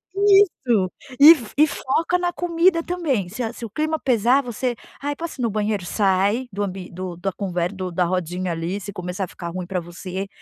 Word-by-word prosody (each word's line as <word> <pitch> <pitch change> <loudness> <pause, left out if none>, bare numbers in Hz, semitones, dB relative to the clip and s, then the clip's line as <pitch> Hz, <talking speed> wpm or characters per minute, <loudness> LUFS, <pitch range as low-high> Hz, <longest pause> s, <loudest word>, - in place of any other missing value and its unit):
Isso! 380 - +4 0.3
E 300 +4 +11
fo 235 -7 -9
e 305 +2 +6
foca 315 +5 0
na 355 -1 -1
comida 340 0 +2
também. 295 - -1
Se 215 +7 -6
a 225 0 -3
se 235 - -7
o - - -7
clima 310 +7 -1
pesar, 250 +2 +3
você: 245 0 -2 0.3
"Ai, 290 +1 -2
posso 330 -2 -6
ir - - -1
no 230 - +2
banheiro?" 210 -3 -1
Sai 200 +6 +1
do 205 +1 -2
ambi 190 -2 -5
do 180 0 -6
da 195 +3 -2
conver 180 -2 -2
do 185 -2 -5
da 180 +1 +1
rodinha 180 0 -2
ali 170 +4 -3
se 200 0 -7
começar 180 +2 -4
a - - -14
ficar 170 0 -7
ruim 180 +1 -5
pra 185 -1 -1
você, 185 +3 -6
205 Hz, 215 wpm, -22 LUFS, 185-285 Hz, 0.3 s, E